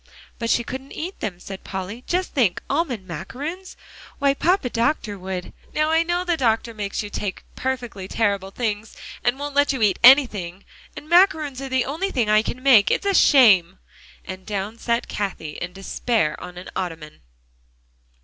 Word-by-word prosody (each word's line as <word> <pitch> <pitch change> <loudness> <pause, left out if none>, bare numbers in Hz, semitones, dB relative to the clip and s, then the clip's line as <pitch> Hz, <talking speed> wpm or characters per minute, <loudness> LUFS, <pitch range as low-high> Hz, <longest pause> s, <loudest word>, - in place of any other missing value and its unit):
"But 230 -1 -2
she 235 - +2
couldn't 265 +3 -7
eat 360 +5 -6
them," 180 -4 -4
said 195 +1 -9
Polly. 195 +5 -6
"Just 365 +1 -1
think, 225 -10 +2
almond 275 - -1
macaroons! 295 - -6 0.4
Why, 280 -1 +3
Papa 320 -3 +1
Doctor 230 -3 0
would" 185 -1 -5 0.2
"Now 305 +1 +2
I 325 0 +4
know 345 +1 0
the 350 -2 +1
doctor 230 -2 +1
makes 205 -1 -3
you 205 - -8
take 200 -2 -4
perfectly 245 -7 -4
terrible 200 -3 0
things, 215 0 -4 0.3
and 245 +2 +1
won't 290 0 -5
let 285 0 +3
you 255 -4 -1
eat 200 -3 +2
anything. 210 -9 +5 0.3
And 300 - -9
macaroons 310 -6 +3
are 270 - -5
the 260 -1 +1
only 325 +9 -2
things 235 - 0
I 215 0 +5
can 250 +3 -6
make. 240 -7 +6
It's - - 0
a 400 - +2
shame!" 195 - +5 0.5
and 190 0 -7
down 205 +3 -4
sat 235 0 -1
Cathie 190 -7 -4
in 175 - -4
despair 195 -2 -1
on 180 0 -9
an 180 - -8
ottoman. 165 -4 -5
230 Hz, 175 wpm, -22 LUFS, 195-280 Hz, 0.5 s, make